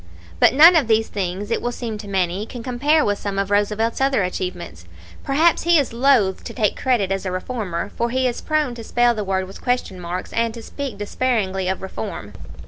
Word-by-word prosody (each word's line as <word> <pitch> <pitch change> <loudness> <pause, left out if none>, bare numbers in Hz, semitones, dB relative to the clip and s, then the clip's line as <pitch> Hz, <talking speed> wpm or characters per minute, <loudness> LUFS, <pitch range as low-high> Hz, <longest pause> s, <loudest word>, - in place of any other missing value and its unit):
"But - - +5
none 330 +5 +9
of 305 -8 +3
these 220 0 +2
things, 195 +1 -4
it - - 0
will 240 - -2
seem 230 -3 -5
to 205 - -8
many, 190 +1 -1
can 240 -1 -8
compare 285 +6 +2
with 205 -1 0
some 200 -1 -4
of 195 0 -1
Roosevelt's 210 +4 +1
other 270 -6 +2
achievements. 180 - -5 0.4
Perhaps 315 +5 +3
he 340 0 +4
is 280 -5 0
loath 235 -6 +2
to - - -7
take 215 -5 +1
credit 230 -7 0
as 195 0 -1
a 185 - -3
reformer, 185 -2 -4
for 235 0 -1
he 260 +2 0
is 240 - -3
prone 305 -5 0
to 235 -1 -8
spell 240 +1 +2
the 215 -2 -3
word 190 -1 -1
with 190 +1 -12
question 245 -7 -1
marks, 180 +1 -5
and 230 0 0
to 230 - -9
speak 275 -5 -6
disparagingly 205 -3 -1
of 190 0 -2
'reform.' 190 - -6
220 Hz, 215 wpm, -21 LUFS, 190-250 Hz, 0.4 s, none